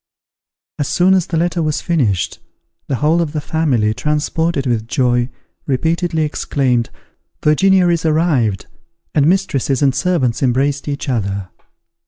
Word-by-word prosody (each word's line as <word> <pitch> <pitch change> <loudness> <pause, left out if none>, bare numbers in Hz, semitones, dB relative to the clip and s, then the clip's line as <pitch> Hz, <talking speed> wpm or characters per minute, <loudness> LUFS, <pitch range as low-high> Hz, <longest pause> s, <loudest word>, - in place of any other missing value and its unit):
As 145 - 0
soon 180 +7 +3
as 185 -3 +2
the 165 - -2
letter 170 +1 0
was 155 -2 -1
finished, 120 - 0 0.5
the 135 - -1
whole 155 +6 +2
of 160 -3 -3
the 155 - -1
family, 140 -8 0
transported 150 +2 -1
with 115 -3 -1
joy, 120 -1 +1 0.4
repeatedly 160 +4 0
exclaimed, 130 -5 0 0.5
"Virginia 185 +4 +4
is 170 -2 +1
arrived!" 155 - +1 0.5
and 145 -1 +3
mistresses 145 -8 +1
and 135 -2 +3
servants 135 -5 0
embraced 135 +3 0
each 145 0 -4
other. 100 -6 -2
145 Hz, 135 wpm, -17 LUFS, 125-165 Hz, 0.5 s, Virginia